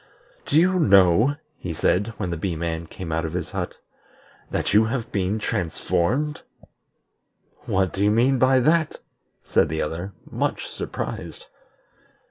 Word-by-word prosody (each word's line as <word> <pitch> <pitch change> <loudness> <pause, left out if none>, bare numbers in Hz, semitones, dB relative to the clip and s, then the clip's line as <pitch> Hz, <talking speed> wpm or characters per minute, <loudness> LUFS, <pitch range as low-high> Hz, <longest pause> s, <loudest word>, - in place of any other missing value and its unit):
"Do - - +2
you 185 +2 +3
know," 100 - +5 0.2
he 85 -3 -5
said, 105 +7 +1
when 90 - -3
the - - -1
Bee 85 +1 -2
man 80 0 -3
came 85 -1 -7
out 80 +1 0
of 80 0 -4
his 90 -2 -3
hut, - - -4 0.7
"that - - -1
you 110 +2 +6
have 115 0 -3
been 100 +1 0
transformed?" 110 - -1 1.3
"What 95 -1 +1
do 100 - -1
you 105 - +4
mean 125 +5 +3
by 130 0 +4
that?" 155 +3 +2 0.5
said - - +2
the 80 +1 -1
other, 85 +6 -5
much - - -2
surprised. - - -6
100 Hz, 145 wpm, -24 LUFS, 85-130 Hz, 1.3 s, you